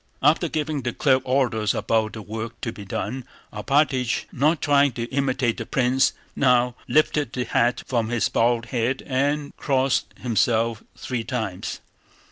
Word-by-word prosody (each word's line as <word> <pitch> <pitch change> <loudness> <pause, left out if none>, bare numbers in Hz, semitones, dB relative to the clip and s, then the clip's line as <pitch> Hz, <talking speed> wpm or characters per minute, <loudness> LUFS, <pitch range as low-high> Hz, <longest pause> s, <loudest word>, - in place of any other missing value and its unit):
After - - +4
giving 155 -2 -2
the 120 -1 -3
clerk 130 -2 +3
orders 120 -5 +1
about 110 -1 0
the 110 - -7
work 110 +2 -6
to 115 - -2
be 100 -2 -10
done, 120 +6 -4 0.3
Alpátych, 130 +2 +1
not 150 +5 +2
trying 140 -2 +3
to 115 - -4
imitate 130 -3 0
the 115 - -4
prince 130 0 +2 0.2
now, 125 -2 +3
lifted 150 -1 +2
the 125 - -1
hat 120 +1 +1
from 115 -3 -1
his 120 -1 +1
bald 115 0 +1
head 125 +2 0
and 145 +2 -1
crossed 135 -2 +1
himself 115 -1 +1
three 125 -3 -3
times. 110 -6 -4
125 Hz, 150 wpm, -24 LUFS, 115-135 Hz, 0.3 s, After